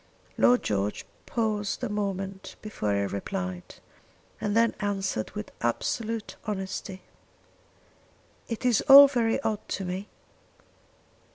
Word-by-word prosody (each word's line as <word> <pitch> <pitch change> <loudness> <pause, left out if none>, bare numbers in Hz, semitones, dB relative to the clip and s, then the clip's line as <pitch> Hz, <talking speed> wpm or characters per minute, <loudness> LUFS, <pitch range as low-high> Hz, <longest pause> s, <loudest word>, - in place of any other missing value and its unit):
Lord 245 0 +4
George 100 0 -1 0.2
paused 215 -1 -1
a - - +1
moment 195 -2 -4
before 105 - -2
he 100 - +1
replied, 95 -2 -5 0.7
and 210 +1 0
then 230 0 +4
answered 195 - -2
with 105 - -6
absolute 220 - -2
honesty. 190 -2 -5 1.4
"It 230 +1 -5
is 240 -4 +4
all 280 +1 +12
very 240 -4 +1
odd 215 -2 0
to 195 - -3
me. 185 +3 -5
205 Hz, 110 wpm, -27 LUFS, 180-225 Hz, 1.4 s, all